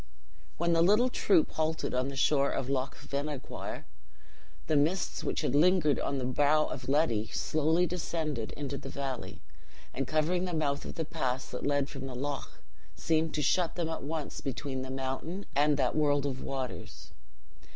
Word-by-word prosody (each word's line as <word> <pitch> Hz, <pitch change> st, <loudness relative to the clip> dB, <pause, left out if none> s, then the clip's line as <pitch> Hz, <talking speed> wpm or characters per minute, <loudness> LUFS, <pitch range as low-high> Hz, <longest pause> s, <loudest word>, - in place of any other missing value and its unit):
When 170 Hz, 0 st, +2 dB
the 165 Hz, -, +4 dB
little 210 Hz, +8 st, +5 dB
troop 190 Hz, -9 st, +3 dB
halted 160 Hz, 0 st, -1 dB
on 125 Hz, +1 st, +1 dB
the 140 Hz, -, -5 dB
shore 140 Hz, +1 st, +3 dB
of 135 Hz, +1 st, -2 dB
Loch 135 Hz, 0 st, -1 dB
Venachoir, 140 Hz, 0 st, -5 dB, 0.8 s
the 155 Hz, -, +1 dB
mists 160 Hz, +6 st, +1 dB
which -, -, -1 dB
had 150 Hz, -, 0 dB
lingered 155 Hz, -1 st, +4 dB
on 140 Hz, -, -1 dB
the 130 Hz, -, -2 dB
brow 145 Hz, +4 st, +3 dB
of 130 Hz, -, -5 dB
Ledi 120 Hz, -7 st, +2 dB
slowly 160 Hz, +3 st, +2 dB
descended 160 Hz, -8 st, -2 dB
into 140 Hz, -1 st, -4 dB
the 135 Hz, -, -7 dB
valley; 135 Hz, -3 st, -5 dB, 0.5 s
and 135 Hz, -1 st, -2 dB
covering 165 Hz, +4 st, +1 dB
the 180 Hz, -2 st, -2 dB
mouth 145 Hz, -3 st, 0 dB
of -, -, -6 dB
the 160 Hz, -, -2 dB
pass 130 Hz, -5 st, -2 dB
that -, -, -3 dB
led 145 Hz, -1 st, +2 dB
from 135 Hz, -2 st, -6 dB
the 130 Hz, -, -6 dB
loch, 140 Hz, +2 st, -5 dB, 0.3 s
seemed 160 Hz, 0 st, +1 dB
to 150 Hz, -, 0 dB
shut 175 Hz, +4 st, +2 dB
them 170 Hz, -2 st, -1 dB
at 160 Hz, -, -3 dB
once 150 Hz, +1 st, -4 dB
between 135 Hz, 0 st, -3 dB
the 130 Hz, -, -5 dB
mountain 135 Hz, +8 st, -3 dB
and 145 Hz, +1 st, +4 dB
that -, -, +1 dB
world 145 Hz, -2 st, +3 dB
of 130 Hz, -2 st, -3 dB
waters. 135 Hz, -2 st, -5 dB
145 Hz, 175 wpm, -31 LUFS, 135-160 Hz, 0.8 s, little